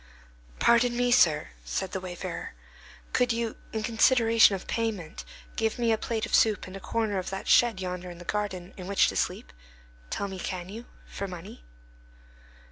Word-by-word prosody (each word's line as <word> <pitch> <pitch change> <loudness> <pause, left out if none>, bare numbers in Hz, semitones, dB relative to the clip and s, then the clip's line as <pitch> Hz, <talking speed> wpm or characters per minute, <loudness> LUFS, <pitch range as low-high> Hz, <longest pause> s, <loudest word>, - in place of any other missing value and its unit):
"Pardon 240 +1 +4
me, 245 0 +2
sir," 160 -11 +4
said 120 - -3
the 190 - -2
wayfarer, 180 -1 -6 0.6
"Could 250 -1 +3
you, 230 -1 -2
in 220 -1 -3
consideration 230 -1 +5
of 190 - -7
payment, 210 -8 -3 0.3
give 225 -1 0
me 235 -2 +2
a 220 - +3
plate 225 -1 -2
of - - -9
soup 215 -3 +4
and 185 - -9
a - - -6
corner 215 -1 -1
of 185 - -4
that 195 0 -5
shed 235 -5 +5
yonder 180 -1 -4
in 175 - -9
the 175 - -11
garden, 190 -2 -3
in 185 -1 -7
which 200 0 +4
to - - -5
sleep? - - -2 0.6
Tell 200 - -2
me; 190 -1 -7
can 180 0 -4
you? 225 +4 -8 0.2
For 200 - -5
money?" 180 - -9
200 Hz, 180 wpm, -28 LUFS, 185-230 Hz, 0.6 s, consideration